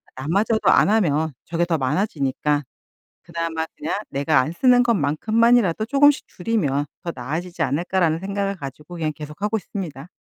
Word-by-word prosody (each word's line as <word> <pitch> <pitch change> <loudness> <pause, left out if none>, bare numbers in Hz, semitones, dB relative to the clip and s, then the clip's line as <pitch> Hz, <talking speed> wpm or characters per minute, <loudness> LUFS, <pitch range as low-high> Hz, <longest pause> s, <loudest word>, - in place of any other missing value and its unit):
나마저도 195 - +1
안 - - +5
하면 160 -8 +2
저게 170 +1 0
더 170 -2 0
많아지니까 145 -1 0 0.6
그나마 165 -1 -3
그냥 300 - -2 0.2
'내가 145 +3 +2
안 150 - -3
쓰는 245 +5 +4
것만큼만이라도 220 - +2
조금씩 285 +3 +3
줄이면 160 -9 -1 0.2
더 170 - -3
나아지지 160 +8 -5
않을까?' 180 +6 -1
라는 160 -2 +2
생각을 200 +1 -2
가지고 150 +3 -9
그냥 155 -2 -1
계속하고 175 +9 -3
있습니다. 170 -8 -7
170 Hz, 375 characters per minute, -22 LUFS, 150-210 Hz, 0.6 s, 안